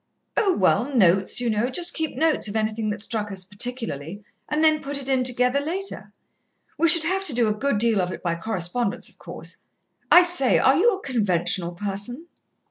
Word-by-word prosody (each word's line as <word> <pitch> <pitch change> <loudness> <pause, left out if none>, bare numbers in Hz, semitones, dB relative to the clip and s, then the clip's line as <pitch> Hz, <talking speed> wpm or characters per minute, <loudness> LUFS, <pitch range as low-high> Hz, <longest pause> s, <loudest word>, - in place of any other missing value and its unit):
"Oh, 390 -4 +1
well, 210 +7 +2
notes, 190 -2 +3
you 245 - -2
know 220 +2 0
just 345 +6 0
keep 320 -1 -3
notes 320 -7 +1
of 205 - -6
anything 215 0 -1
that 205 0 -3
struck 215 -3 -3
us 190 -1 -4
particularly, 205 - -4 0.3
and 300 +1 0
then 310 -1 +3
put 280 +1 -5
it 270 - -8
in 260 -2 +1
together 250 +2 +1
later. 360 +7 -4 0.6
We 335 +2 +2
should 335 -1 +7
have 380 +4 -1
to 305 - +1
do 235 -2 +2
a 210 - +1
good 270 +2 -1
deal 220 -2 +1
of 180 0 -3
it - - -8
by 170 -2 0
correspondence, 195 +3 -3
of - - -21
course.... - - -9 0.5
I 355 - +9
say, 350 -8 +4
are 265 - +4
you 455 +8 +3
a 385 - -12
conventional 185 -7 -1
person?" 205 - -5
240 Hz, 200 wpm, -23 LUFS, 205-300 Hz, 0.6 s, I